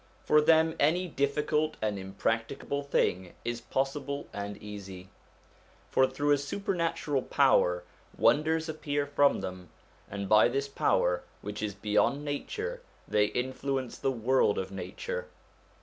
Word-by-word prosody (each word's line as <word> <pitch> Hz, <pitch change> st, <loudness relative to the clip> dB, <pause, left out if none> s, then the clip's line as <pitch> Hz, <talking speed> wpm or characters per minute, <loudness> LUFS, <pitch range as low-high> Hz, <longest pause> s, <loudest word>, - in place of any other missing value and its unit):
For 150 Hz, -, +5 dB
them, 160 Hz, +1 st, +4 dB
any 175 Hz, +5 st, +3 dB
difficult 150 Hz, +1 st, 0 dB
and 105 Hz, -2 st, -1 dB
impracticable 115 Hz, +8 st, -2 dB
thing 95 Hz, -10 st, 0 dB
is 120 Hz, 0 st, -2 dB
possible 140 Hz, +1 st, -2 dB
and 100 Hz, 0 st, -5 dB
easy. 95 Hz, -3 st, -9 dB, 0.8 s
For 130 Hz, -, +4 dB
through 145 Hz, +3 st, 0 dB
a 145 Hz, -, +4 dB
supernatural 165 Hz, -3 st, -1 dB
power -, -, +3 dB, 0.3 s
wonders 160 Hz, +2 st, +3 dB
appear 145 Hz, -2 st, -2 dB
from 145 Hz, 0 st, +3 dB
them, 90 Hz, -2 st, -7 dB, 0.4 s
and 100 Hz, 0 st, -4 dB
by 105 Hz, +3 st, +6 dB
this 135 Hz, +3 st, -1 dB
power, 90 Hz, -9 st, +1 dB, 0.2 s
which 105 Hz, +1 st, -5 dB
is 105 Hz, -2 st, -3 dB
beyond 105 Hz, +8 st, +1 dB
nature, 440 Hz, -, -4 dB, 0.3 s
they 105 Hz, -1 st, +3 dB
influence 130 Hz, +2 st, -3 dB
the 135 Hz, -, +1 dB
world 125 Hz, -3 st, +2 dB
of 95 Hz, 0 st, -3 dB
nature. 480 Hz, -, -5 dB
135 Hz, 130 wpm, -30 LUFS, 105-150 Hz, 0.8 s, by